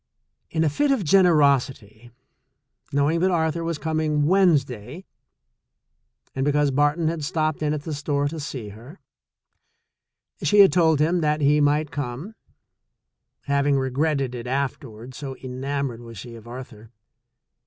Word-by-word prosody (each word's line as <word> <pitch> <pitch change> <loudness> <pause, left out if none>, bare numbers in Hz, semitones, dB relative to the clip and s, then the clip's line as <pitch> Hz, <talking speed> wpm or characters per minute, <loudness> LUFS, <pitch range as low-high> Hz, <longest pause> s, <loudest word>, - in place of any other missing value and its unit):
In 160 - 0
a 160 - +2
fit 290 - 0
of 270 -7 +1
generosity, 140 - +2 0.8
knowing 145 +4 +1
that 185 +2 +2
Ar 160 -3 +1
thur 170 +1 -5
was 165 -1 -2
coming 155 -1 0
Wednesday, 150 - +1 1.3
and 135 - -2
because 145 0 +2
Barton 145 +4 +1
had 160 -1 -2
stopped 155 +1 -1
in 150 -1 0
at 150 -1 -3
the 160 - -5
store 145 0 -1
to 160 +1 -6
see 130 -7 -6
her, 120 - -13 1.4
she 205 -1 +5
had 195 - +6
told 160 -4 +3
him 170 +3 +2
that 150 0 +1
he 145 +1 +3
might 150 +1 +1
come, 140 - -5 1.1
having 140 0 +1
regretted 135 0 -1
it 120 0 -6
afterward, 130 -3 -4
so 135 0 -6
en 130 -1 -8
amored 140 -4 -2
was 115 -2 -11
she 120 +4 -9
of 115 0 -12
Arthur. 120 -3 -10
145 Hz, 145 wpm, -23 LUFS, 130-160 Hz, 1.4 s, had